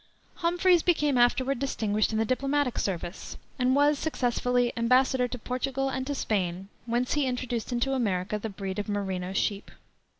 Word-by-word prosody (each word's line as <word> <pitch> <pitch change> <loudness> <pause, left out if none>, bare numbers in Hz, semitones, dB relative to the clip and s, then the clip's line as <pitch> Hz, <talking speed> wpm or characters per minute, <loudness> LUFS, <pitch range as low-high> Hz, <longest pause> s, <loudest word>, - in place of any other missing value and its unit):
Humphreys 350 0 +3
became 300 -5 +2
afterward 250 +2 +2
distinguished 215 -6 0
in 220 - -1
the 225 - +2
diplomatic 275 +2 0
service, 175 -1 -4 0.2
and 255 +1 +3
was, 290 0 +3
successively, 245 -4 0
embassador 250 +2 +3
to 250 - -6
Portugal 265 +3 -2
and 260 0 -3
to 285 - -2
Spain, 190 -5 -2 0.2
whence 240 +2 0
he 295 -2 +1
introduced 245 -2 -3
into 245 +3 0
America 210 -5 -1
the 220 - -4
breed 195 -1 -5
of 205 - -4
merino 190 -3 -2
sheep. 200 +1 -1
245 Hz, 160 wpm, -28 LUFS, 210-270 Hz, 0.2 s, Humphreys